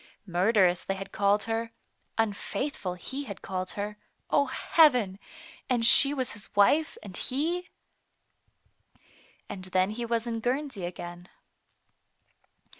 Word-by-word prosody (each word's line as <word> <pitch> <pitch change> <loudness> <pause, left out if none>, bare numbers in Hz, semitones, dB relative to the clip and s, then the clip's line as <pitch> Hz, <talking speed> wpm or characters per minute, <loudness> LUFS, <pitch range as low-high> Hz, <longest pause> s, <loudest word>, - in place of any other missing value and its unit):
Murderess 185 -1 +3
they 195 - -2
had 195 0 -7
called 200 +1 +2
her, 225 0 -2 0.5
unfaithful 225 -1 -2
he 265 +10 -6
had 200 -6 -8
called 185 -1 -3
her, 210 +1 -4 0.3
O 280 -1 +3
Heaven! 250 - +3 0.5
and 240 -3 +2
she 275 +4 +7
was 265 -3 -2
his 210 -1 -10
wife, 295 +11 +4
and 195 -3 -9
he 335 - -2 1.8
And 185 -2 -6
then 185 +1 +1
he 235 +2 -4
was 230 0 0
in 230 -1 -2
Guernsey 250 -4 -2
again. 175 0 -8
220 Hz, 120 wpm, -28 LUFS, 190-260 Hz, 1.8 s, she